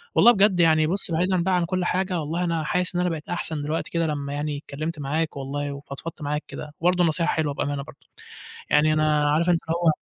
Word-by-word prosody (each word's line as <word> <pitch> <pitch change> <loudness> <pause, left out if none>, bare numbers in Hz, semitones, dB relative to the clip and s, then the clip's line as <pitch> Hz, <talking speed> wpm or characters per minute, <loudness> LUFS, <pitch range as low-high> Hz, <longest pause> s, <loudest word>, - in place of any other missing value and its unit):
والله 240 - +8
بجد 195 -4 +3
يعني 155 -2 +4
بُصّ 185 0 +2
بعيدًا 180 +1 +1
بقى 190 0 +2
عن 175 - +1
كل 180 +1 -1
حاجة 185 -1 0
والله 165 +4 -2
أنا 165 -2 -1
حاسس 180 +3 -1
إن 180 - +1
أنا 180 - +1
بقيت 155 -2 -6
أحسن 160 -3 -3
دلوقتي 155 +3 -2
كده 170 -1 0
لمّا 145 -2 -3
يعني 145 0 -2
اتكلمت 155 +2 -5
معاك 155 +2 -2
والله، 140 +1 -3
وفضفضت 140 +3 -8
معاك 150 +1 -2
كده، 150 0 -8
وبرضه 180 +1 +3
نصيحة 165 +1 +2
حلوة 155 -3 0
بأمانة 145 0 -2
برضه، - - -16 0.6
يعني 150 +1 +4
أنا 150 -1 +2
عارف 165 +4 +2
أنت 170 -2 +3
اللي 165 - +1
هو 165 - +6
160 Hz, 220 wpm, -24 LUFS, 150-175 Hz, 0.6 s, والله